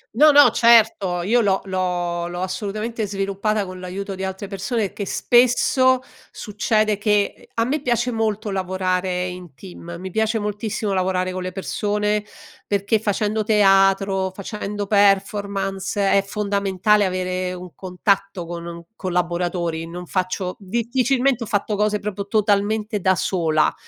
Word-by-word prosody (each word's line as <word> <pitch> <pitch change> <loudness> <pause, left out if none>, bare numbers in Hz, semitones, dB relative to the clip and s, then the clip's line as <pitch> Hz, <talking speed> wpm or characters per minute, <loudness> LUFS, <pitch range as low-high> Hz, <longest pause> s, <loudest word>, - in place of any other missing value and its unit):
No, 305 +5 +7
no 285 -4 +7
certo! 220 -7 +4
Io 235 +6 +3
l'ho 195 -3 +2
l'ho 175 -2 -2
l'ho 175 +1 -5
assolutamente 215 +3 -3
sviluppata 200 +1 -1
con 185 0 -8
l'aiuto 195 +2 -5
di 190 0 -6
altre 190 +1 -4
persone 200 +2 -2
che 200 - -5
spesso, 255 +3 +3 0.3
succede 215 0 0
che 205 -1 +2
ehm, - - -21
a 230 - +2
me 275 +5 -1
piace 240 -1 0
molto 215 -2 -1
lavorare 185 -1 -1
in 180 -5 -8
team, 175 -1 -10
mi 185 +2 -7
piace 220 +3 0
moltissimo 210 0 -3
lavorare 185 0 0
con 185 - -4
le 185 0 -4
persone, 210 +2 -1 0.4
perché 205 +2 +1
facendo 210 +1 -1
teatro, 195 -2 +3
facendo 205 0 -5
performance, 195 -1 +1
è 200 - +4
fondamentale 200 0 +1
avere 185 0 -2
un 180 -1 -9
contatto 195 0 -1
con 170 0 -7
un 170 0 -8
collaboratori, 175 -3 -2
non 180 +1 -7
faccio 185 +1 -2
difficilmente 245 +4 0
ho - - -7
fatto 205 0 -1
cose 210 +1 +1
proprio 200 -1 -5
totalmente 210 0 +1
da 190 0 +2
sola. 160 -5 +1
200 Hz, 140 wpm, -21 LUFS, 185-215 Hz, 0.4 s, No